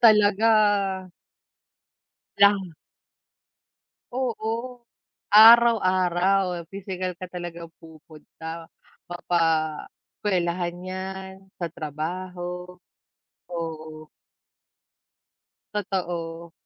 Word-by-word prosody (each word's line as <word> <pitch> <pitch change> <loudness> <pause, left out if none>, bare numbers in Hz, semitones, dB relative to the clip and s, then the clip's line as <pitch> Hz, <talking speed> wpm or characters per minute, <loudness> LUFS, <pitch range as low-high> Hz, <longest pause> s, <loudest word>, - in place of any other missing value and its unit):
talaga 215 -1 +5 1.9
lang. 195 -4 +4 1.4
Oo, 240 0 -3 0.5
araw-araw, 190 -5 +5
pisikal 185 -2 -5
ka 185 - -7
talagang 170 -2 -7
pupunta, 160 +1 -11 0.4
mapa 175 0 -1 0.8
eskwelahan 175 -3 -1
‘yan, 190 +1 -6 0.3
sa 170 - -1
trabaho, 180 +3 -5 0.8
oo. 155 -2 -6 1.7
Totoo. 170 -4 -4
180 Hz, 55 wpm, -25 LUFS, 170-200 Hz, 1.9 s, talaga